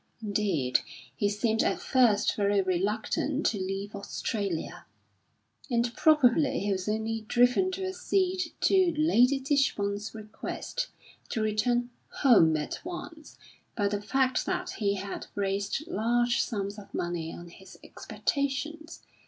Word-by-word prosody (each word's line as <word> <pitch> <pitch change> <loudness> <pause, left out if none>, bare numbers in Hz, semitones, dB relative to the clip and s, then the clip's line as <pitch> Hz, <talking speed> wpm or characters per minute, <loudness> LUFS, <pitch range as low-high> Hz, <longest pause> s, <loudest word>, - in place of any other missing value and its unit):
Indeed 200 - +1 0.4
he 205 - +1
seemed 220 +2 +1
at - - +1
first 235 -6 +3
very 200 -1 +2
reluctant 210 - -1
to 210 - +1
leave 195 +2 -4
Australia, 200 -3 -4 0.8
and 235 -1 0
probably 300 -2 +4
he 205 +1 -1
was 185 +1 -2
only 220 +1 -1
driven 245 - +3
to 380 +1 -3
accede 375 -1 0
to 370 -4 +4
Lady 275 -4 +4
Tichborne's 220 -7 0
request, 220 - -5 0.4
to 220 - -1
return 240 +3 +1 0.2
"home" 165 - +5
at 150 - -5
once, 340 -3 -8 0.4
by 205 -3 +1
the 205 0 -2
fact 260 +4 +1
that - - -2
he 200 -2 0
had 200 0 -6
raised 200 +8 -1
large 240 -4 +1
sums 200 -1 -3
of 200 - -13
money 175 -2 -3
on 175 0 -10
his 190 +2 -14
expectations. 300 +4 -3
220 Hz, 130 wpm, -28 LUFS, 200-275 Hz, 0.8 s, home